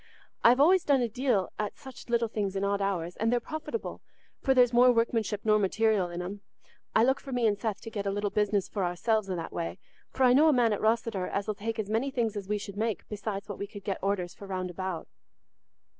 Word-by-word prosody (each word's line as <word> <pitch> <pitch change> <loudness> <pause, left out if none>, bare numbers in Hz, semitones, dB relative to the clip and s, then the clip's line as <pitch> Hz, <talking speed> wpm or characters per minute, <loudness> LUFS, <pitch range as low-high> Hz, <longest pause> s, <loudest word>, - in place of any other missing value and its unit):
I've 245 +2 +6
always 350 +5 +5
done 280 -3 +3
a - - +1
deal 230 -5 0
at 210 -1 -3
such 265 -3 -12
little 235 -1 +2
things 205 -3 -2
in 195 - -1
odd 200 0 0
hours, 180 -3 -2
and 225 +1 +1
they're 245 - +3
profitable, 315 - -5 0.4
for 265 -2 +2
there's 245 -1 +5
more 250 +1 +7
workmanship 225 -3 0
nor 215 -1 +4
material 205 -1 +2
in 175 +1 -4
'em. 200 +3 -6 0.5
I 220 - +6
look 265 +3 +3
for 275 - -9
me 245 -2 +1
and 210 -2 +3
Seth 205 0 -3
to 225 - -8
get 205 -2 -3
a - - +1
little 205 0 -1
business 205 -2 +1
for 200 - -3
ourselves 195 +4 0
i' 185 - -1
that 165 -1 -5
way, 85 +2 -3 0.3
for 265 - -1
I 250 -1 +6
know 295 +5 +6
a 310 - +5
man 235 -4 +3
at 205 - -3
Rosseter 220 -4 +1
as 200 +1 -2
'ull 215 - 0
take 225 +3 -4
as 215 -2 -2
many 225 +6 0
things 235 -5 -1
as 200 -1 -6
we 210 - +1
should 200 -1 -8
make, 220 -3 -2
besides 205 -1 -4
what 205 - -7
we 200 - -3
could 205 -1 -10
get 195 -2 -2
orders 190 -3 -1
for 200 - -11
round 185 -1 -3
about." 185 -2 -4
215 Hz, 245 wpm, -29 LUFS, 195-235 Hz, 0.5 s, more